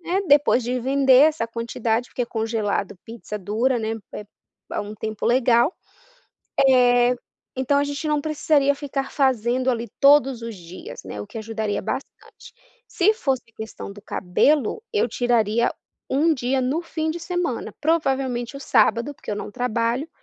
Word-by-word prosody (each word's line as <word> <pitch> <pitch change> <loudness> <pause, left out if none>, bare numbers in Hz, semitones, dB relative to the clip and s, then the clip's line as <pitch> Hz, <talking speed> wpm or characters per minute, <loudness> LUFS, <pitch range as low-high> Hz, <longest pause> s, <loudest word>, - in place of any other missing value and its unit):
né, 360 +3 -1
depois 285 -4 +4
de 250 +1 -1
vender 265 0 +4
essa 300 -7 -2
quantidade, 230 0 -2
porque 245 -2 -3
congelado 220 -4 -2
pizza 225 -2 -7
dura, 225 +6 0
né 220 0 -2 0.2
é 210 - -6 0.5
a - - -1
um 205 +1 -7
tempo 215 -1 -5
legal, 245 +4 +3 1.0
eh, 245 -1 +4 0.4
então 265 +2 +2
a 285 - +2
gente 285 +2 -4
não 300 -1 +1
precisaria 290 -2 +2
ficar 275 -1 -4
fazendo 255 -1 +1
ali 235 -1 -3
todos 275 -4 +5
os 230 -1 -5
dias, 175 +1 -10
né. 100 +2 -7
O - - -10
que - - -8
ajudaria 220 -1 -3
bastante. 265 +7 -7 0.4
Se 420 +5 +2
fosse 270 - -1
a - - -46
questão 220 -2 -7
do 205 0 -13
cabelo, 280 - +1
eu 435 +1 +1
tiraria 235 -1 +1 0.4
1 300 +5 +3
dia 260 +1 0
no 270 +7 -1
fim 315 -2 -3
de 335 +1 -5
semana, 345 -7 -3
provavelmente 270 -5 0
o - - -9
sábado, 235 +3 +2
porque - - -9
eu 205 - -2
não - - -6
trabalho, 240 +5 -1
250 Hz, 160 wpm, -23 LUFS, 225-280 Hz, 1.0 s, todos